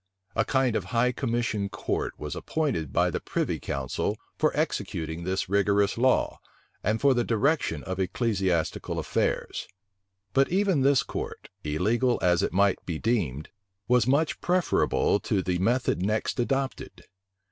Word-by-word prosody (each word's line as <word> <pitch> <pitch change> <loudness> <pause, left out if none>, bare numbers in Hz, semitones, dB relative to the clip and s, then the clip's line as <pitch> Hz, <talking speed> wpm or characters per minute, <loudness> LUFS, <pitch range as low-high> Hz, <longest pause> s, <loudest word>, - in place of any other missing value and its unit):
A 110 - +3
kind 130 -1 +1
of 95 - -1
high 115 +6 +2
commission 115 -5 -1
court 105 - -3
was 75 -1 -5
appointed 130 - -2
by - - +2
the - - -2
privy - - -2
council, 70 -2 -2 0.2
for - - +2
executing 80 +1 -2
this 95 +1 -1
rigorous 100 +1 +2
law, 130 +2 +2 0.4
and 110 +3 +1
for 140 -1 +4
the 120 -1 +1
direction 115 - +1
of 95 0 -4
ecclesiastical 95 -4 0
affairs. - - -1 0.7
But 135 0 +3
even 190 -5 +2
this 135 -1 +4
court, - - -6
illegal 110 - +1
as 90 0 +3
it - - 0
might 100 +1 +2
be 85 -3 -3
deemed, 80 - -1 0.4
was 125 -2 +3
much 145 +4 +1
preferable 175 - +2
to 100 -1 -1
the 90 -1 -1
method 120 0 +1
next 105 +5 -1
adopted. 135 +2 -2
110 Hz, 145 wpm, -27 LUFS, 95-130 Hz, 0.7 s, for